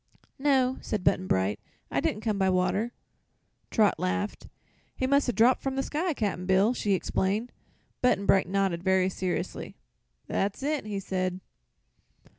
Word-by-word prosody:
"No," 265 Hz, -2 st, +2 dB
said 210 Hz, -4 st, -3 dB
Button 185 Hz, 0 st, +2 dB
Bright; 95 Hz, -, +1 dB, 0.3 s
"I -, -, +1 dB
didn't 210 Hz, -, -1 dB
come 215 Hz, -3 st, -1 dB
by 190 Hz, 0 st, +3 dB
water." 190 Hz, +5 st, +1 dB, 0.8 s
Trot 210 Hz, -7 st, +3 dB
laughed. 205 Hz, +3 st, -2 dB, 0.5 s
"He 260 Hz, -, -1 dB
must 280 Hz, 0 st, +3 dB
'a' -, -, +3 dB
dropped 240 Hz, +2 st, +4 dB
from 270 Hz, -1 st, -2 dB
the 270 Hz, -, 0 dB
sky, 320 Hz, +3 st, -1 dB
Cap'n 195 Hz, -6 st, -2 dB
Bill!" 195 Hz, +5 st, +4 dB
she 205 Hz, -5 st, 0 dB
exclaimed. 200 Hz, +5 st, -1 dB, 0.5 s
Button 250 Hz, -6 st, +2 dB
Bright 190 Hz, -3 st, +3 dB
nodded, 195 Hz, -3 st, 0 dB
very 190 Hz, -1 st, +3 dB
seriously. 185 Hz, -1 st, -3 dB, 0.5 s
"That's 200 Hz, +6 st, -1 dB
it," 295 Hz, -5 st, -1 dB
he 205 Hz, -2 st, -3 dB
said. 185 Hz, -1 st, -2 dB
200 Hz, 150 wpm, -28 LUFS, 185-250 Hz, 0.8 s, dropped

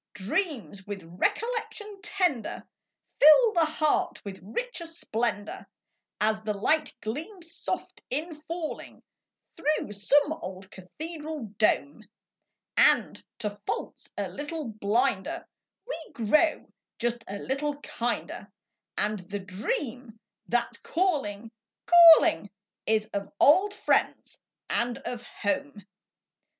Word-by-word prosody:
D 195 Hz, -2 st, -7 dB
REAMS 295 Hz, -, -1 dB
\9ith 195 Hz, -1 st, -7 dB, 0.2 s
recollection 430 Hz, -3 st, -2 dB
tender 355 Hz, -, -1 dB, 0.6 s
Fill 430 Hz, +10 st, +8 dB
the 335 Hz, -2 st, +4 dB
Heart 310 Hz, -1 st, +1 dB
Ntfith 195 Hz, -1 st, -6 dB
richer 340 Hz, -, -4 dB
' -, -, -5 dB
splendor, 220 Hz, -3 st, -2 dB, 0.5 s
As 215 Hz, +1 st, +2 dB
the 210 Hz, -1 st, -2 dB
light 305 Hz, +9 st, +2 dB
gleams 330 Hz, -, -6 dB
soft -, -, -4 dB
in 305 Hz, +6 st, -2 dB, 0.2 s
jullinq 335 Hz, -2 st, -5 dB, 0.5 s
Through 305 Hz, -7 st, 0 dB
some 285 Hz, +9 st, +3 dB
ola 185 Hz, +1 st, -7 dB
cathedral 300 Hz, -, -7 dB
dome; 155 Hz, -6 st, +2 dB, 0.7 s
And, -, -, +4 dB
to 215 Hz, -3 st, -2 dB, 0.2 s
faults -, -, -4 dB
a -, -, -1 dB
little 295 Hz, -2 st, -5 dB
blinder, 225 Hz, -, 0 dB, 0.6 s
ADe -, -, -21 dB
gt'oxtf 305 Hz, +8 st, +2 dB, 0.3 s
just 240 Hz, 0 st, -1 dB
a 200 Hz, -, -5 dB
little 280 Hz, +5 st, -2 dB, 0.2 s
hinder, 240 Hz, 0 st, -2 dB, 0.5 s
And 210 Hz, 0 st, 0 dB
the 205 Hz, -, -2 dB
dream 225 Hz, -, -4 dB, 0.3 s
that's 240 Hz, +1 st, 0 dB
call 345 Hz, -, +1 dB
inq, 205 Hz, +2 st, -7 dB, 0.3 s
calling, 335 Hz, -8 st, +8 dB, 0.9 s
old 380 Hz, +8 st, +6 dB
friends -, -, 0 dB, 0.3 s
and 240 Hz, 0 st, 0 dB
o 245 Hz, -, -3 dB
home. 240 Hz, -1 st, -3 dB
260 Hz, 110 wpm, -28 LUFS, 210-325 Hz, 0.9 s, Fill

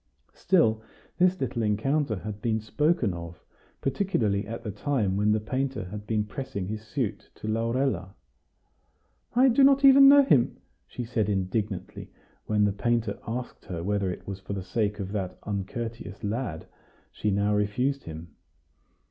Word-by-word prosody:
Still, 115 Hz, -13 st, +2 dB, 0.4 s
this 185 Hz, +1 st, +4 dB
little 125 Hz, -2 st, -2 dB
encounter 110 Hz, +5 st, +1 dB
had 105 Hz, +1 st, -6 dB
been 110 Hz, -1 st, 0 dB
spoken 130 Hz, -, +1 dB
of, 85 Hz, -1 st, -8 dB, 0.4 s
particularly 110 Hz, -, 0 dB
at 115 Hz, +1 st, -6 dB
the 105 Hz, -, -4 dB
time 105 Hz, -2 st, 0 dB
when 105 Hz, +1 st, +2 dB
the 110 Hz, -, +2 dB
painter 130 Hz, +2 st, -2 dB
had 105 Hz, 0 st, -7 dB
been 105 Hz, -2 st, 0 dB
pressing 105 Hz, -4 st, -5 dB
his 105 Hz, +1 st, -4 dB
suit 110 Hz, 0 st, -4 dB
to 110 Hz, -, -8 dB
Laurella. 115 Hz, -1 st, -1 dB, 1.2 s
"I 255 Hz, +2 st, +6 dB
do 270 Hz, +3 st, +4 dB
not 275 Hz, 0 st, +6 dB
even 275 Hz, 0 st, +9 dB
know 285 Hz, 0 st, +8 dB
him," 135 Hz, -, +3 dB, 0.3 s
she 125 Hz, -, -6 dB
said 115 Hz, -3 st, -1 dB
indignantly, 100 Hz, 0 st, -2 dB, 0.4 s
when 105 Hz, -1 st, +3 dB
the 100 Hz, -, +1 dB
painter 115 Hz, 0 st, 0 dB
asked 120 Hz, +2 st, -5 dB
her 85 Hz, -3 st, -5 dB
whether 100 Hz, 0 st, 0 dB
it -, -, -8 dB
was 100 Hz, -1 st, -6 dB
for 95 Hz, +1 st, -6 dB
the 95 Hz, -2 st, -4 dB
sake 105 Hz, +1 st, -1 dB
of 95 Hz, -1 st, -4 dB
that 95 Hz, -3 st, -3 dB
uncourteous 105 Hz, +1 st, -5 dB
lad 105 Hz, -6 st, -3 dB, 0.5 s
she 105 Hz, -, -2 dB
now 100 Hz, +1 st, +1 dB
refused 125 Hz, +7 st, 0 dB
him. 80 Hz, -1 st, -9 dB
110 Hz, 155 wpm, -27 LUFS, 100-130 Hz, 1.2 s, even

